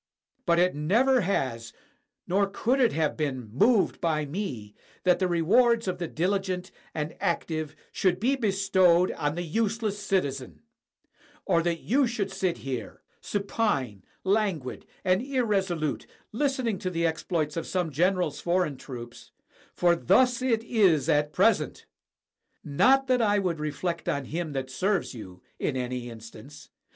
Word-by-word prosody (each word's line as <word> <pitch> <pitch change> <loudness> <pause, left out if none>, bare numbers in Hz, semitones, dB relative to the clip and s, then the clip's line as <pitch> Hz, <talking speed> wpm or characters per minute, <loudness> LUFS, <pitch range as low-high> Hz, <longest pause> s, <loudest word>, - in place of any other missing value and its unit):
But 170 0 +4
it 180 +1 +3
never 235 - +3
has 130 - -2 0.5
nor 200 +2 +2
could 240 +6 0
it 245 -3 +4
have 155 -2 0
been 130 -8 -3
moved 210 - +3
by 155 -4 0
me 140 - -5 0.3
that 180 -1 +3
the 185 - +2
re 170 -2 0
wards 235 +4 +4
of 180 -1 -2
the 170 - -2
diHgent 185 +2 -1 0.2
and 150 0 -3
active 155 -3 -2 0.2
should 180 -2 +1
be 255 +6 +2
bestowed 190 -6 +3
on 145 +1 -2
the 175 - -3
useless 215 +3 -1
citizen; 140 - -2 0.8
or 170 - +3
that 170 -1 -1
you 265 +2 +2
should 215 -5 -2
sit 190 -2 -1
here, 130 -4 -5 0.2
supine, 195 - -1 0.2
languid, 190 -9 -1 0.2
and 185 +2 +3
irresolute, 200 - -1 0.2
listening 255 -4 -1
to 190 -3 -2
the 170 -1 -1
exploits 160 -2 -1
of 165 - -3
some 180 -4 -1
general's 175 -1 +1
foreign 175 -5 0
troops, 120 -3 -9 0.2
— - - -30
for 175 -1 +3
thus 245 +9 +3
it 230 -4 +1
is 190 - +3
at 150 0 +2
present. - - +1 0.8
Not 265 - +3
that 255 -2 +2
I 205 -2 +3
would 180 -5 -1
reflect 155 +3 -3
on 140 -1 -1
him 160 +2 -4
that 130 -1 -4
serves 190 +5 0
you, 95 -6 -11 0.2
in 130 - -1
any 125 -1 -3
in 115 -1 -10
stance. 105 -9 -12
175 Hz, 150 wpm, -27 LUFS, 150-205 Hz, 0.8 s, But